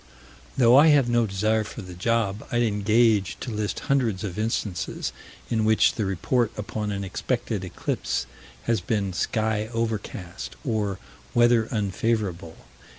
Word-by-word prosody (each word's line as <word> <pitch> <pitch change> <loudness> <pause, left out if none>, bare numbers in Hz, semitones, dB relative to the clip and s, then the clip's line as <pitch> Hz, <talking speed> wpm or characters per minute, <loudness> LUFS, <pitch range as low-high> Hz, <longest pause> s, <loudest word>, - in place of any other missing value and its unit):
Though 125 0 +6
I 150 +3 +8
have 145 -5 +5
no 120 -1 +2
desire 110 +3 +1
for 110 +1 -8
the 90 -1 -9
job, 105 +2 0
I'd 120 0 +2
engage 105 -1 +2
to 120 - -5
list 105 -1 -2
hundreds 115 -8 +1
of 100 -1 -4
instances 110 -4 -2 0.3
in 110 -2 0
which 110 0 +4
the 110 - -2
report 105 +5 0
upon 105 0 -3
an 100 -1 -3
expected 110 +1 -2
eclipse 90 -7 -2 0.4
has 110 +5 +1
been 100 -1 -1
"sky 110 +2 0
overcast" 110 -5 -4
or 105 -5 -1 0.4
"weather 120 -1 +4
unfavorable." 100 -5 -1
110 Hz, 140 wpm, -25 LUFS, 100-115 Hz, 0.4 s, I